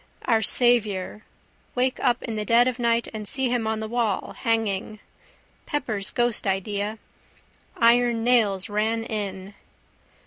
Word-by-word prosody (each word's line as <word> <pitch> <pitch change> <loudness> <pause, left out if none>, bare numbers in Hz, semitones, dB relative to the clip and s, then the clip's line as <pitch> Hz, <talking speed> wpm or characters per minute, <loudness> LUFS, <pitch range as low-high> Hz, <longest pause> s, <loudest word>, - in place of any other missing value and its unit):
Our 225 -2 +3
Saviour. 215 -4 +2 0.5
Wake 255 +1 0
up 245 -2 +1
in 225 - -4
the 210 - -2
dead 235 +3 +4
of 255 0 -2
night 235 -1 +1
and 215 -1 -6
see 265 +2 +1
him 235 -3 0
on 220 0 -2
the 220 - -4
wall, 230 -3 -1
hanging. 215 -2 -1 0.7
Pepper's 220 -9 -2
ghost 240 -3 +1
idea. 200 +2 -2 0.8
Iron 235 0 +3
Nails 215 -6 +2
Ran 220 +2 -1
In. 200 -3 -5
225 Hz, 135 wpm, -24 LUFS, 210-240 Hz, 0.8 s, dead